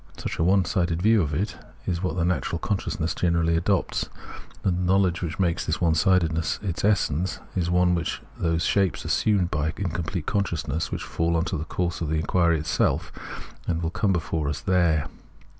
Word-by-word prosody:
Such -, -, -5 dB
a -, -, +3 dB
one 95 Hz, +1 st, +4 dB
sided 85 Hz, -2 st, 0 dB
view 110 Hz, +3 st, +4 dB
of 75 Hz, -4 st, -1 dB
it 95 Hz, +8 st, -2 dB, 0.3 s
is 85 Hz, -2 st, -1 dB
what 90 Hz, -2 st, -1 dB
the 85 Hz, -2 st, +1 dB
natural 90 Hz, -1 st, 0 dB
conscious 95 Hz, +1 st, -2 dB
ness 80 Hz, +1 st, 0 dB
generally 85 Hz, -1 st, +1 dB
adopts; 95 Hz, +3 st, 0 dB, 0.5 s
and 95 Hz, -3 st, +2 dB
a -, -, -1 dB
knowledge, 90 Hz, -2 st, +2 dB
which 80 Hz, -3 st, -3 dB
makes 90 Hz, -3 st, +1 dB
this 80 Hz, -, 0 dB
one 85 Hz, -3 st, +3 dB
sidedness 80 Hz, -1 st, +2 dB
its 85 Hz, -4 st, -3 dB
essence, 95 Hz, -4 st, +1 dB, 0.2 s
is 85 Hz, -2 st, 0 dB
one 90 Hz, 0 st, +3 dB
of 85 Hz, -, -2 dB, 0.2 s
those 85 Hz, -1 st, +1 dB
shapes 100 Hz, -3 st, +1 dB
assumed 100 Hz, -5 st, +2 dB
by 75 Hz, -1 st, 0 dB
incomplete 85 Hz, -3 st, -3 dB
consciousness 80 Hz, -6 st, -1 dB
which -, -, -3 dB
falls 85 Hz, 0 st, 0 dB
into 85 Hz, +3 st, -1 dB
the 80 Hz, -1 st, -3 dB
coujse 85 Hz, 0 st, -2 dB
of 80 Hz, -, -1 dB
the 80 Hz, -, 0 dB
inquiry 85 Hz, +1 st, +2 dB
itself 75 Hz, +1 st, 0 dB, 0.6 s
and 85 Hz, -1 st, -1 dB
will 80 Hz, -, -1 dB
come 100 Hz, +2 st, +1 dB
before 80 Hz, -4 st, -1 dB
us 75 Hz, -, -2 dB
there. 85 Hz, -5 st, +2 dB
85 Hz, 190 wpm, -25 LUFS, 80-95 Hz, 0.6 s, one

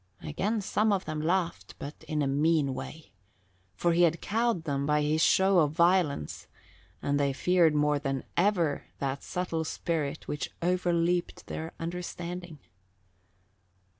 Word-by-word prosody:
Again 205 Hz, -, -1 dB
some 215 Hz, +2 st, +1 dB
of 195 Hz, -2 st, 0 dB
them 155 Hz, -1 st, -3 dB
laughed, 175 Hz, +1 st, -1 dB
but 145 Hz, +2 st, -8 dB
in 150 Hz, -1 st, 0 dB
a -, -, +1 dB
mean 145 Hz, 0 st, +2 dB
way, 155 Hz, +4 st, -8 dB, 0.6 s
for 170 Hz, -1 st, +2 dB
he 170 Hz, -, +3 dB
had 170 Hz, -1 st, +4 dB
cowed 225 Hz, -4 st, 0 dB
them 140 Hz, -2 st, -1 dB
by 150 Hz, 0 st, +2 dB
his 155 Hz, +2 st, +1 dB
show 190 Hz, +1 st, +5 dB
of 150 Hz, -2 st, +2 dB
violence 170 Hz, -, +1 dB, 0.6 s
and 145 Hz, 0 st, +1 dB
they 140 Hz, -1 st, +1 dB
feared 170 Hz, +1 st, +3 dB
more 150 Hz, 0 st, +2 dB
than 135 Hz, -2 st, -2 dB
ever 175 Hz, -6 st, +2 dB
that 135 Hz, 0 st, -2 dB
subtle 180 Hz, -3 st, -2 dB
spirit 160 Hz, -2 st, -3 dB
which 150 Hz, -, -3 dB
over 180 Hz, +1 st, +1 dB
leaped 175 Hz, +1 st, 0 dB
their 160 Hz, +1 st, -5 dB
understanding. 175 Hz, 0 st, -5 dB
165 Hz, 145 wpm, -29 LUFS, 150-180 Hz, 0.6 s, show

